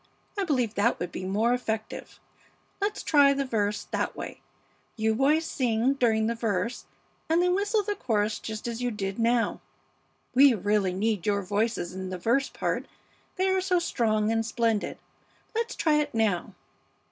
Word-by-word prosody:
I 400 -2 -1
believe 250 - 0
that 225 +3 +1
would 175 0 -4
be 185 - -5
more 215 +5 +2
effective. 220 -3 -4 0.6
Let's 410 +1 -1
try 285 -2 +5
the 275 - 0
first 255 - -13
verse 210 -2 0
that - - -1
way; - - -7 0.5
you 220 0 +1
boys 290 +7 +2
sing 245 -2 +1
during 225 -5 +2
the 230 - +1
verse 225 0 -2 0.4
and 325 +1 +3
then 360 0 +3
whistle 410 +2 +1
the 415 +1 -1
chorus 220 - -1
just 220 +1 -6
as 235 0 -4
you 245 - 0
did 195 -2 -4
now. 230 0 +1 0.7
We 265 -1 +7
really 205 -2 +1
need 210 -2 -1
your 200 -1 +1
voices 205 -2 -1
in 190 0 -5
the 185 - -4
verse 240 +9 +1
part, - - -2 0.5
they 375 0 +1
are 380 0 +2
so 365 -1 +2
strong 220 -10 +1
and 225 0 +1
splendid. 225 -2 0 0.6
Let's 460 +1 -2
try 310 -2 +2
it 295 -4 -1
now." 210 -6 0
230 Hz, 170 wpm, -27 LUFS, 210-280 Hz, 0.7 s, We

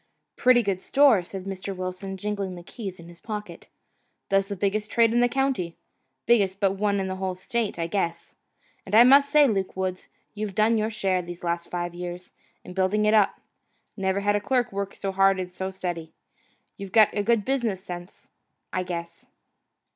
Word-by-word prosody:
"Pretty 250 -1 +4
good 195 -3 -1
store," 275 -7 +5
said 185 +2 -8
Mr. 195 0 -5
Wilson, 185 +1 -5
jingling 200 -2 -3
the 175 - -10
keys 195 -2 -7
in 170 - -12
his 170 0 -14
pocket, 210 -1 -7 0.6
"does 195 0 +2
the 200 - -4
biggest 205 +2 -1
trade 230 -1 +3
in 240 - +3
the 245 0 +4
county, 260 -10 -1 0.5
biggest 200 -5 +3
but 195 -2 +3
one 200 +1 0
in 190 - -1
the 190 0 -4
whole 190 -1 -2
state, 215 +3 -2
I 165 - -1
guess. 170 -1 -3 0.5
And 195 - -2
I 230 - +10
must 280 +3 +6
say, 295 -1 +6
Luke 195 -5 -1
Woods, 185 -1 -3 0.3
you've 210 -2 -5
done 220 +2 +3
your 215 +1 0
share, 195 -4 0
these 175 0 -9
last 170 0 -2
five 175 -1 -3
years, 175 0 -7 0.3
in 180 - -10
building 190 +3 +1
it 210 - +3
up. 210 -3 +3 0.5
Never 195 -1 0
had 205 +1 +2
a 205 - 0
clerk 250 -1 0
work 200 0 -4
so 195 - -3
hard 195 0 +3
and 180 -1 -4
so 190 +1 -4
steady. 175 -4 -5 0.6
You've 195 -1 -8
got 215 -1 +6
good 225 -1 +2
business 235 -8 -1
sense, 175 0 -9 0.4
I 185 - 0
guess." 170 -2 -6
195 Hz, 190 wpm, -25 LUFS, 185-215 Hz, 0.6 s, I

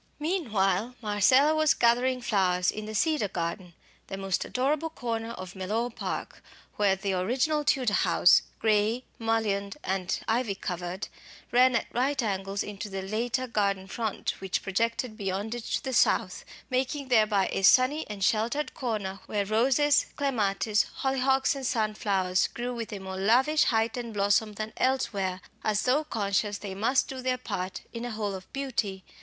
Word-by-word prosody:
Meanwhile 235 - 0
Marcella 245 +8 +4
was 310 -1 +3
gathering 250 +2 +2
flowers 185 -5 +2
in 215 0 -6
the 215 - -6
"Cedar 305 -3 +2
garden," 175 -1 -4 0.3
the 195 - -5
most 195 -1 -1
adorable 285 +5 0
corner 230 -6 -4
of 185 -2 -8
Mellor 215 +6 -2
Park, - - -5 0.4
where 200 -2 +3
the 195 0 -2
original 250 +11 +1
Tudor 255 -6 +2
house, 180 - +5 0.2
grey, 220 +3 +1 0.2
mullioned 220 -2 -1
and 190 -1 -1
ivy 225 -3 0
covered, 180 -1 -4 0.4
ran 250 +1 +5
at - - +1
right 265 +3 0
angles 195 -1 -2
into 205 0 -6
the 195 -1 -4
later 235 +6 -1
"garden 200 -5 0
front," 220 +1 -2
which 190 -1 -2
projected 230 +3 -1
beyond 200 +3 -3
it 240 -1 -6
to - - -2
the 265 - -3
south, - - +2 0.3
making 265 +2 -1
thereby 215 -5 +3
a - - -1
sunny 255 +9 +5
and 205 -2 -4
sheltered 235 +9 +1
corner 210 -6 -3
where 205 -1 -1
roses, 265 +7 +3
clematis, 215 -6 +1 0.2
hollyhocks, 265 0 +2
and 270 -2 -3
sunflowers 205 -5 +1
grew 245 +1 -4
with 230 -1 -5
a 205 - -4
more 190 -1 -6
lavish 255 +10 +3
height 225 -1 +1
and 235 -3 -5
blossom 205 +2 +2
than 215 +1 -5
elsewhere, 200 -8 0 0.2
as 215 0 +1
though 275 +5 +2
conscious 205 -5 -1
they 200 -2 -6
must 225 +7 +1
do 260 -1 -6
their 255 0 0
part 190 -6 -4
in 230 0 -5
a 245 - -3
whole 215 -3 -3
of 190 -1 -9
beauty. 230 -9 -3
220 Hz, 160 wpm, -28 LUFS, 195-255 Hz, 0.4 s, house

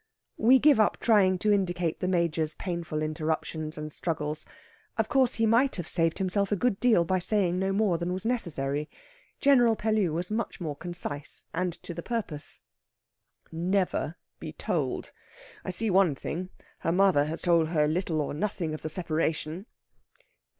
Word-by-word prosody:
We 245 +4 +6
give 285 -2 +5
up 215 - +3
trying 195 -5 +4
to 210 +3 +2
indicate 175 -4 0
the 185 - -1
Major's 165 -4 +1
painful 170 -4 -3
interruptions 155 0 -2
and 150 0 -5
struggles. 155 -1 -3 0.5
Of - - 0
course, 265 -4 +3
he 225 - +2
might 235 +5 +3
have 175 -3 -5
saved 165 -2 +1
himself 195 +1 0
a - - +3
good 205 0 0
deal 225 -9 +4
by 185 +2 +1
saying 185 -1 +1
no 190 +1 0
more 195 -4 +1
than 175 +1 -2
was 185 +3 -4
necessary. 150 - -2 0.5
General 245 -5 +5
Pellew 215 -5 +1
was 175 +5 -2
much 220 0 -2
more 155 -5 -4
concise 150 -3 -4
and 180 +1 -1
to 175 - -5
the 170 - -6
purpose. 200 -10 -2 0.9
"Never 175 -1 -1 0.2
be - - -7
told. - - -2 0.5
I - - -5
see 210 +4 +2
one 185 -6 +4
thing. 180 +6 -5 0.3
Her 165 - 0
mother 180 -5 +4
has 160 +2 -4
told 170 -3 +3
her 155 -2 +2
little 160 -1 0
or 145 - -3
nothing 170 -1 -2
of 155 - -6
the 155 - -4
separation." 160 +2 -2
175 Hz, 165 wpm, -28 LUFS, 160-205 Hz, 0.9 s, We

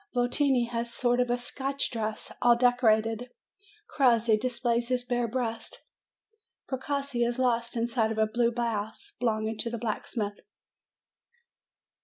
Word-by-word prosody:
Votini 245 0 +2
has 235 0 -2
a - - -10
sort 245 0 +1
of 245 0 +1
Scotch 270 +3 -2
dress, 220 -2 -4
all 240 -1 +6
decorated; 235 -1 +2 0.6
Crossi 235 -5 +3
displays 235 0 0
his 250 0 0
bare 245 -1 0
breast; 230 -1 -4 0.8
Precossi 275 -1 -2
is 240 +1 0
lost 240 -2 +1
inside 230 -1 +1
of 220 - -3
a 220 - +4
blue 235 +2 +1
blouse 230 - -3
belong 220 -3 0
ing 220 0 -4
to 230 - -1
the 235 - -4
blacksmith. 215 -2 -3
240 Hz, 135 wpm, -28 LUFS, 225-245 Hz, 0.8 s, all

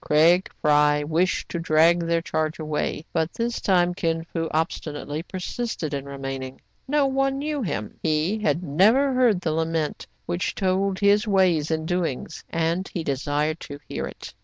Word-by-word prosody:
Craig 165 +5 +4
Fry 150 -1 +4
wished 165 +5 0
to 170 - -3
drag 165 +1 +4
their 170 0 0
charge 155 -1 -1
away; 155 0 -2
but 165 0 0
this 235 0 -2
time 180 -2 +3
Kin 165 -2 -1
Fo 165 -1 -3
obstinately 155 -1 -2
persisted 185 - -4
in 140 -1 -3
remaining. 135 -1 -6 0.3
No 290 +1 +3
one 270 0 +1
knew 295 0 -2
him. 110 - -4
He 160 +7 +1
had 205 -5 0
never 215 - +4
heard 240 -7 +3
the 165 - -1
lament 160 -1 -1 0.2
which 175 +1 -2
told 190 0 +1
his 205 +2 +3
ways 185 -6 +3
and 160 0 -1
doings, 170 -3 -2
and 165 +3 0
he 170 - -3
desired 145 +2 -1
to 145 - -8
hear - - -3
it. - - -10
165 Hz, 160 wpm, -24 LUFS, 155-190 Hz, 0.3 s, Craig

